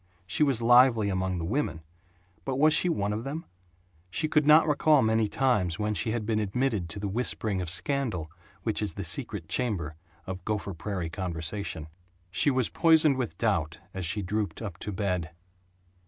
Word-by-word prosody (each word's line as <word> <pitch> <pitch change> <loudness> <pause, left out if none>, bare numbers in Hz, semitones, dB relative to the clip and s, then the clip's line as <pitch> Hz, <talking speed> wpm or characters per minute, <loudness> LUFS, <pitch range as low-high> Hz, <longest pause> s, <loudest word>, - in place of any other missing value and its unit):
She 90 - -2
was 135 -6 +3
lively 120 -3 +5
among 95 -1 -1
the 85 - -3
women 100 - -2 0.6
but 135 - -2
was 155 +2 +5
she 180 - +5
one 105 -10 -1
of 110 +2 -4
them? 150 +5 -5 0.6
She 155 - -1
could 150 -1 +2
not 155 +1 +7
recall 150 -2 +4
many 110 0 +2
times 105 -9 +1
when 105 0 -1
she 110 - -2
had 110 -1 -2
been 110 0 0
admitted 105 -3 -1
to 90 - -6
the 100 - -3
whispering 105 -2 -1
of 90 - -4
scandal 95 - 0 0.3
which 110 -1 -1
is 105 - -2
the 100 - -4
secret 90 - -2
chamber 90 - -2 0.3
of 95 -1 -6
Gopher 105 -2 -3
Prairie 90 -1 -4
conversation. 85 -2 -4 0.4
She 120 - +2
was 130 -3 +2
poisoned 160 -4 +4
with 115 -10 -3
doubt, 85 -8 0 0.2
as 95 - -4
she 95 +5 0
drooped 105 +2 -2
up 100 -7 -7
to 105 - -5
bed. 90 -5 -2
105 Hz, 180 wpm, -28 LUFS, 90-125 Hz, 0.6 s, not